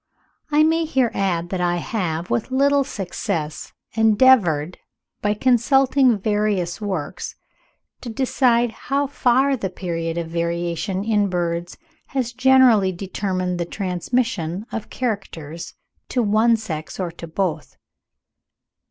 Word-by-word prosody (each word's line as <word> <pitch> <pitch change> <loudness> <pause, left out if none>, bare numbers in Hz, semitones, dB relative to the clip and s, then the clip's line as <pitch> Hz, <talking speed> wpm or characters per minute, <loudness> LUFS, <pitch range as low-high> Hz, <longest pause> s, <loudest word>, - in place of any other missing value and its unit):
I 300 0 +4
may 325 +1 +2
here 260 -6 +1
add 175 -3 -1
that 185 -1 -2
I 175 0 +1
have, 175 -3 -3
with 120 - 0
little 280 +2 +3
success, 185 - -4 0.2
endeavoured, 215 - +4 0.4
by 205 0 +1
consulting 260 +1 +3
various 205 -3 -1
works, 185 -8 -4 0.7
to 245 - -6
decide 240 -1 +2
how 275 +5 -1
far 270 0 +2
the 200 -6 -3
period 165 -2 -4
of 170 -1 -2
variation 170 +3 -2
in 210 -2 +1
birds 175 -1 -2 0.3
has 255 -4 -2
generally 255 -6 +5
determined 185 -1 -3
the 170 - -1
transmission 185 0 -2
of 225 - -5
characters 170 - -5 0.3
to 250 - +1
one 220 +2 +3
sex 160 -8 -6
or 180 -2 -2
to 170 0 -9
both. 160 -2 -3
200 Hz, 120 wpm, -22 LUFS, 175-245 Hz, 0.7 s, generally